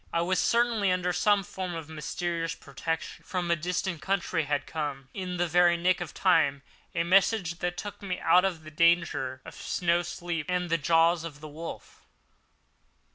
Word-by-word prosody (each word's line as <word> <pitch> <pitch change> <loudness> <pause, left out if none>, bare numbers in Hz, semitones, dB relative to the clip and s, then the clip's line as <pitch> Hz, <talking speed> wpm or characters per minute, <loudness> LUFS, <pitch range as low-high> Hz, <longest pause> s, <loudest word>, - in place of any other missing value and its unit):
I 170 - +1
was 180 +1 +1
certainly 230 -3 +2
under 180 0 0
some 200 +3 +3
form 185 -1 -5
of 165 -2 -6
mysterious 165 +1 -3
protection. 165 +4 -5
From 180 -3 -2
a - - +4
distant 175 0 -2
country 180 -2 0
had 145 0 -1
come, 145 -4 -4
in 180 -2 -4
the 175 - +2
very 175 +1 +4
nick 180 +1 +2
of 175 - -4
time, 155 -7 +2 0.3
a 170 - +2
message 180 -1 +3
that 175 0 -2
took 205 -1 -6
me 185 -3 -3
out 180 - +5
of 175 -5 -1
the 155 - -10
danger 165 -5 +2
of - - -10
the - - -10
snow 175 -1 +1
sleep 170 -2 -4
and 180 -1 -1
the 165 - +2
jaws 165 +2 +3
of 155 -4 -8
the 155 - -9
wolf. 160 +3 -9
170 Hz, 185 wpm, -28 LUFS, 160-180 Hz, 0.3 s, out